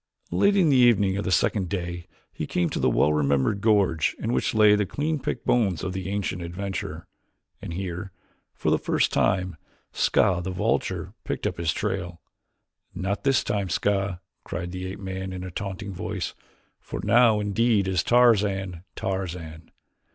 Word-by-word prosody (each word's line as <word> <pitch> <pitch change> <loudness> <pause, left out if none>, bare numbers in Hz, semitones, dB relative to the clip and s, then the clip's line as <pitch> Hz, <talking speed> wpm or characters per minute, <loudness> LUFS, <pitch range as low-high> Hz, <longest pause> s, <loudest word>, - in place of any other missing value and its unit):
Late 200 0 +3
in 175 -5 +4
the 135 - +4
evening 105 -6 +4
of 100 - -3
the 95 - -1
second 95 -1 +1
day 85 -3 -4 0.3
he - - -4
came 85 -2 0
to - - -2
the - - +3
well 75 - +3
remembered 70 +7 +1
gorge 100 -8 +2
in 115 +2 -2
which - - 0
lay 105 -1 +6
the 105 -2 0
clean 150 - -1
picked - - -4
bones 100 -9 +2
of 90 0 -3
the 95 0 -4
ancient 100 -3 -2
adventurer, 95 +3 -5 0.6
and - - -6
here, 95 +2 -5 0.4
for - - 0
the - - +3
first - - +1
time, 90 -2 +1 0.3
Ska, 90 -2 +2
the 95 - -3
vulture, 90 -1 -1
picked - - -4
up - - -2
his 85 -2 +1
trail. 90 +1 -3 0.8
"Not 95 +2 -2
this 135 -2 +3
time, 100 -3 -1
Ska," 95 -1 0 0.2
cried 90 0 -5
the 90 0 -5
ape 95 - -7
man 95 -1 -5
in 90 0 -6
a 95 - -6
taunting 100 +2 -5
voice, - - -4 0.5
"for - - -7
now 115 -3 +5
indeed 105 0 +2
is 95 -2 +1
Tarzan 100 -6 +3
Tarzan. 85 -4 -4
95 Hz, 170 wpm, -25 LUFS, 90-105 Hz, 0.8 s, lay